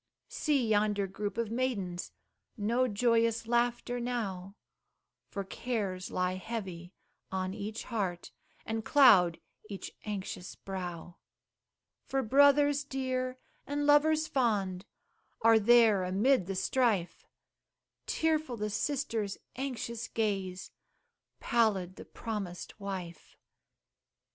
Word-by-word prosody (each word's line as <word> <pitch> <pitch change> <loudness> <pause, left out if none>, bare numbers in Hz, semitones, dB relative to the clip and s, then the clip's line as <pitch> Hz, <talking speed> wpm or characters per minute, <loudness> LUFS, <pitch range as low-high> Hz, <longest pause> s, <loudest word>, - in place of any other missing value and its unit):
See 280 -6 +1
yonder 210 -1 +2
group 205 +2 -5
of 230 -2 -1
maidens, 210 -8 -2 0.5
No 235 +5 +1
joyous 230 +1 +2
laughter 240 +1 0
now, 200 -6 -3 0.7
For 200 - -4
cares 195 -3 -3
lie 180 0 -1
heavy 185 -5 -6 0.4
on 185 0 -2
each 215 +2 -5
heart 190 -7 -3 0.3
And 225 0 -2
cloud 205 - +6 0.3
each 200 -2 -6
anxious 195 -3 -5
brow: 175 -3 -6 0.9
For 270 0 0
brothers 285 +3 +5
dear, 255 -2 -2 0.3
and 290 +1 -1
lovers 305 +2 +4
fond, 205 -9 0 0.6
Are 225 0 +7
there 220 -3 +5
amid 195 +3 +2
the 195 - -3
strife; 210 -4 0 0.8
Tearful 310 -6 0
the 210 0 -2
sister's 225 -4 -1 0.2
anxious 235 -3 -4
gaze 195 -4 -2 0.7
Pallid 200 -6 +1
the - - -9
promised 205 -5 -6
wife. 185 -5 -7
220 Hz, 100 wpm, -31 LUFS, 190-250 Hz, 0.9 s, Are